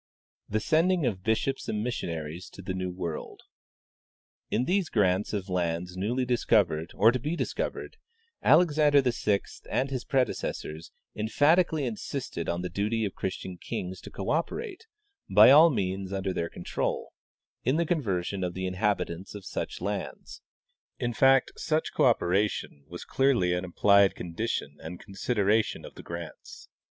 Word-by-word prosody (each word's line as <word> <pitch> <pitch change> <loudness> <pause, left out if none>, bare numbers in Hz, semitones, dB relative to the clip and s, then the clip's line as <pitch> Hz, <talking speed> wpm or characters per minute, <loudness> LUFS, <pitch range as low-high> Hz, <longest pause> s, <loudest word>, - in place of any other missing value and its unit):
"TAe 110 - +2
Sending 165 - +2
of 100 -7 -1
Bishops 110 +6 -1
and. 105 0 -1
Missionaries 85 -8 -4
to 95 - -12
the 95 - -3
New 95 0 -3
World. 85 -3 -5 0.6
" - - -69
In 120 +4 +1
these 185 0 +1
grants 95 -2 +2
of 100 -2 -3
lands 90 -1 -2
newly 120 +7 -1
discovered 100 -10 +2
or 110 +4 +6
to 130 - -2
be 150 +7 -2
discovered - - -3 0.4
Alexander 150 -3 +5
VI 105 -5 +1 0.3
and 135 +1 0
his 130 -2 -2
predecessors 115 - -2 0.2
emphatically 150 +7 +2
insisted 115 -5 -4
on 85 +1 -2
the 90 - -3
duty 105 +5 -1
of 100 - -4
Christian 95 -1 -5
kings 90 0 -5
to - - -9
cooperate, 360 - -3 0.4
by - - +8
all 155 +4 +9
means 95 - -2
under 95 -1 -2
their 85 -1 -2
control, 85 - -3 0.5
in 130 +4 +2
the 170 +1 +2
conversion 100 - -1
of 90 -1 -3
the 95 0 -3
inhabitants 95 -1 -2
of 100 -2 -8
such - - -4
lands; - - -5 0.6
in 120 0 -2
fact, 135 +2 +4
such 155 0 -1
cooperation 90 -6 +1
was 85 +2 -8
a - - -17
clearly 125 -10 +2
implied 95 +2 +3
condition 85 -5 -3
and 80 +2 -7
con 100 - -13
sideration 105 0 +1
of - - -10
the - - -10
grants. 85 -1 -9
105 Hz, 150 wpm, -28 LUFS, 90-130 Hz, 0.6 s, all